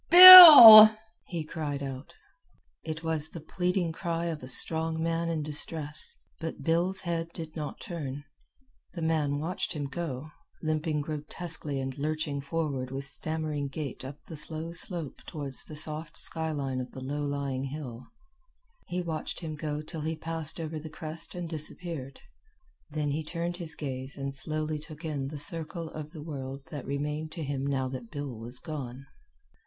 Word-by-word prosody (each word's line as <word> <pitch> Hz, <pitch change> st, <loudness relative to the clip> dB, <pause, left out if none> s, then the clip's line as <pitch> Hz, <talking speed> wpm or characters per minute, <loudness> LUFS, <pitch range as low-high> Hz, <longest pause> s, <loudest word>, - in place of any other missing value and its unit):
"Bill!" 320 Hz, -12 st, +13 dB, 0.4 s
he 170 Hz, -4 st, -5 dB
cried 150 Hz, -3 st, -5 dB
out. 135 Hz, 0 st, -8 dB, 0.7 s
It 160 Hz, +1 st, -7 dB
was 160 Hz, -1 st, +1 dB
the 165 Hz, -, -9 dB
pleading 180 Hz, +2 st, -2 dB
cry 170 Hz, 0 st, -4 dB
of 160 Hz, -2 st, -6 dB
a 125 Hz, -, -10 dB
strong 160 Hz, +4 st, 0 dB
man 165 Hz, +1 st, -2 dB
in 160 Hz, -2 st, -3 dB
distress, 150 Hz, 0 st, -4 dB, 0.2 s
but 160 Hz, 0 st, -7 dB
Bill's 175 Hz, +3 st, +2 dB
head 165 Hz, -2 st, -4 dB
did 160 Hz, -1 st, -8 dB
not 150 Hz, -2 st, -6 dB
turn. 145 Hz, -5 st, -7 dB, 0.7 s
The 170 Hz, -, -5 dB
man 155 Hz, -3 st, -1 dB
watched 165 Hz, +5 st, -4 dB
him 150 Hz, -3 st, -5 dB
go, 150 Hz, -1 st, -6 dB, 0.3 s
limping 155 Hz, -1 st, -2 dB
grotesquely 150 Hz, 0 st, -5 dB
and 130 Hz, -1 st, -5 dB
lurching 150 Hz, -1 st, -3 dB
forward 140 Hz, -4 st, -4 dB
with 135 Hz, +1 st, -6 dB
stammering 155 Hz, 0 st, -2 dB
gait 140 Hz, -2 st, -7 dB
up 135 Hz, +2 st, -9 dB
the 160 Hz, -, -10 dB
slow 155 Hz, +2 st, -3 dB
slope 170 Hz, -3 st, -3 dB
toward 145 Hz, -5 st, -7 dB
the 155 Hz, -, -9 dB
soft 155 Hz, +1 st, -2 dB
sky 160 Hz, -1 st, 0 dB
line 135 Hz, -4 st, -4 dB
of 125 Hz, -, -8 dB
the 130 Hz, -, -9 dB
low 145 Hz, +3 st, -4 dB
lying 140 Hz, -2 st, -4 dB
hill. 130 Hz, -4 st, -8 dB, 0.8 s
He 180 Hz, 0 st, -4 dB
watched 160 Hz, 0 st, -5 dB
him 160 Hz, -2 st, -6 dB
go 150 Hz, -1 st, -5 dB
till 155 Hz, +1 st, -8 dB
he 160 Hz, +2 st, -3 dB
passed 160 Hz, 0 st, -3 dB
over 160 Hz, -1 st, -5 dB
the 155 Hz, +1 st, -10 dB
crest 160 Hz, +2 st, +2 dB
and 175 Hz, -1 st, -5 dB
disappeared. 155 Hz, -3 st, -5 dB, 0.7 s
Then 150 Hz, -1 st, -3 dB
he 155 Hz, +2 st, -3 dB
turned 170 Hz, +2 st, -5 dB
his 165 Hz, -3 st, -4 dB
gaze 130 Hz, -2 st, -7 dB
and 135 Hz, 0 st, -4 dB
slowly 155 Hz, +1 st, +1 dB
took 155 Hz, +1 st, -11 dB
in 145 Hz, -4 st, -4 dB
the 150 Hz, +2 st, -8 dB
circle 165 Hz, +1 st, -4 dB
of 155 Hz, -1 st, -8 dB
the 155 Hz, -2 st, -11 dB
world 135 Hz, -3 st, -8 dB
that 145 Hz, -5 st, -8 dB
remained 150 Hz, +3 st, -4 dB
to 165 Hz, -, -6 dB
him 140 Hz, -1 st, -4 dB
now 135 Hz, -2 st, -2 dB
that 125 Hz, -3 st, -8 dB
Bill 145 Hz, -4 st, -7 dB
was 115 Hz, +3 st, -7 dB
gone. 135 Hz, -5 st, -8 dB
155 Hz, 170 wpm, -27 LUFS, 140-165 Hz, 0.8 s, Bill